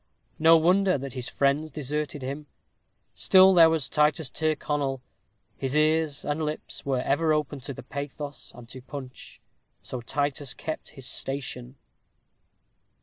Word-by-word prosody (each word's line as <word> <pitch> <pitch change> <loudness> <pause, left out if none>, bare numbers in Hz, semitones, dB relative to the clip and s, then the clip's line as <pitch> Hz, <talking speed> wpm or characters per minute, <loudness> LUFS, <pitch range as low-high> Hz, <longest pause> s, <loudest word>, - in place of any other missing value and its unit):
No 165 +1 +7
wonder 185 +3 +3
that 135 -1 -6
his 125 -2 -4
friends 140 +3 +1
deserted 150 -1 -4
him; 140 +3 -5 0.7
still 190 0 +6
there 165 -2 +8
was 160 -5 0
Titus 150 -1 +1
Tyrconnel; 145 -3 -1 0.6
his 135 +1 -2
ears 155 -1 +2
and 150 +2 -1
lips 150 0 -5
were 135 -2 0
ever 155 +4 +2
open 150 -2 -1
to 135 +1 -7
pathos 140 0 -6
and 120 -1 -12
to 130 0 -8
punch; 130 -1 -10 0.4
so 125 - -6
Titus 140 +1 -2
kept 155 - -5
his 135 - -8
station. 130 -2 -4
145 Hz, 135 wpm, -26 LUFS, 135-155 Hz, 0.7 s, there